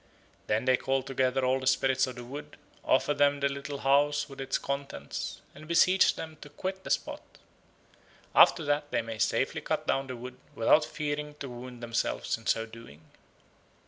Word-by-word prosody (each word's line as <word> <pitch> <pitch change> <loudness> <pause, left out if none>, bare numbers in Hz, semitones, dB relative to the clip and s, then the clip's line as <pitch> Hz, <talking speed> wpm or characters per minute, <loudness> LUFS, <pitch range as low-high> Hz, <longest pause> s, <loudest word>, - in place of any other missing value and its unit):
Then 110 +3 +1
they 130 -1 +4
call 135 0 0
together 130 -1 0
all 130 +1 +2
the 130 - -4
spirits 130 0 +3
of 130 - -6
the 120 - -8
wood, 140 +4 -9 0.3
offer 145 - +3
them 145 0 +3
the 140 - +2
little 140 +1 -5
house 145 +2 +3
with 135 -2 -9
its 135 0 0
contents, 140 0 -5
and 155 - -12
beseech 185 +3 +4
them 160 -1 -8
to 145 - -10
quit 190 +5 -5
the - - -7
spot. - - -1 1.1
After 165 - +6
that 145 0 0
they 120 -4 0
may 115 -1 -6
safely - - +1
cut - - -2
down 135 0 0
the 130 - -5
wood 125 +1 -9 0.2
without 135 +7 +4
fearing 150 -1 -4
to 140 -2 -7
wound 120 0 -9
themselves 115 0 -1
in 115 - -11
so 115 - +2
doing. 110 -9 -13
135 Hz, 180 wpm, -29 LUFS, 125-145 Hz, 1.1 s, After